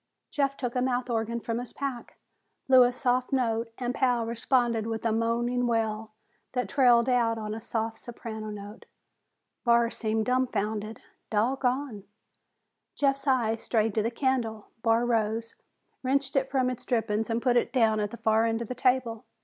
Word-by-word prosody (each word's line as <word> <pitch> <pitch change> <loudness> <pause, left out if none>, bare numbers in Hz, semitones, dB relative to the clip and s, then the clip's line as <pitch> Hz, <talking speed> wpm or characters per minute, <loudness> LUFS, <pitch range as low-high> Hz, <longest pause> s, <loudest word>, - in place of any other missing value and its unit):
Jeff 275 -1 0
took 245 -2 -3
a 250 - +1
mouth 250 -1 0
organ 230 +1 -1
from 230 0 -3
his 245 - -8
pack, 270 -4 -5 0.5
blew 260 -1 +7
a 245 0 +5
soft 250 0 0
note 230 -3 0
and 245 -1 -2
Pal 245 -3 +1
responded 235 -1 +1
with 225 0 -4
a 225 - +2
moaning 240 +2 0
wail 220 -2 -1 0.4
that 250 -4 -1
trailed 245 -1 +4
out 235 -3 +2
on 215 -1 -4
a 225 - -6
soft 225 0 -3
soprano 220 -2 -7
note. 205 +1 -9 0.8
Barr 235 -1 +4
seemed 220 -1 -1
dumfounded. 220 -4 -1 0.3
"Doggone!" 250 0 0 0.9
Jeff's 275 0 0
eyes 230 -4 +2
strayed 220 -2 +1
to 220 - +1
the 225 - 0
candle. 235 -4 -1
Barr 230 +1 +3
rose, 225 -1 0 0.5
wrenched 275 +1 0
it 270 -1 +1
from 260 -2 +1
its 250 - -7
drippings 225 -2 0
and 230 0 0
put 245 0 +2
it 240 - +2
down 225 -4 +3
at 205 -1 -1
the 235 - -9
far 220 0 +2
end 225 +1 -1
of 225 - -10
the - - -2
table. 250 -3 0
235 Hz, 170 wpm, -28 LUFS, 225-250 Hz, 0.9 s, blew